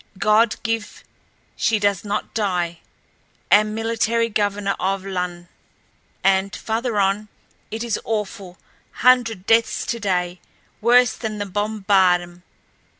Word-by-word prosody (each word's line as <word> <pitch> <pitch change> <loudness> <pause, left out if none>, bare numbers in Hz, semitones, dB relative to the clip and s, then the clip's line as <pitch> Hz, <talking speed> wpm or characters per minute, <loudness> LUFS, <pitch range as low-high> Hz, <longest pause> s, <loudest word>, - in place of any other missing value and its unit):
God 215 +2 +3
give 225 -2 -3 0.5
she 225 - +1
does 200 -3 0
not 210 0 -3
die... 180 -6 -1 0.7
am 215 +1 +4
military 230 +1 0
governor 205 -1 0
of 195 0 -1
Lon 180 -2 -4 0.4
..." - - -40
And 195 0 +2
farther 225 0 -2
on: 200 +2 +1 0.4
"It 220 +2 -4
is 235 -3 -1
awful... 205 -4 -4 0.5
hundred 230 -6 +4
deaths 225 +1 +2
today... 180 -5 -2 0.4
worse 245 +1 +5
than 220 -2 -5
the 205 - -3
bombardm 190 -4 +1
205 Hz, 115 wpm, -21 LUFS, 190-225 Hz, 0.7 s, worse